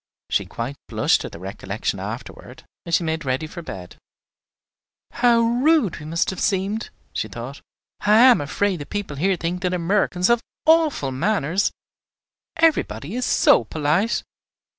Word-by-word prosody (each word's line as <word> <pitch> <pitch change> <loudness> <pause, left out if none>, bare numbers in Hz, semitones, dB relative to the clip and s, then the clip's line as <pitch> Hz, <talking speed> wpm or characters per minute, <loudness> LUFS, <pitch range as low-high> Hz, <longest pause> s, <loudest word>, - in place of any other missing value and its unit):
She - - +1
quite 125 +5 -5
blushed - - +1
at - - -7
the - - -9
recollection 95 +3 -4
afterward, - - -8 0.2
as 170 - +2
she 175 - +1
made 160 0 -2
ready 130 +3 -1
for 170 +3 -8
bed. 90 - -9 1.1
"How 240 -1 +3
rude 245 - +2
we 150 - -9
must 165 +3 0
have 190 - -7
seemed!" 200 +3 -1 0.2
she - - -2
thought. - - -8 0.4
"I 210 - +2
am 245 - +7
afraid 190 +6 0
the 145 - -8
people 205 -9 -4
here 190 +6 +2
think 175 +2 -3
that 180 -1 0
Americans 180 +1 +1
have 235 -1 +3 0.2
awful 315 - +3
manners, 175 +4 0 0.9
everybody 190 - +1
is 250 +1 -1
so - - +4
polite. 155 - 0
180 Hz, 150 wpm, -22 LUFS, 150-230 Hz, 1.1 s, am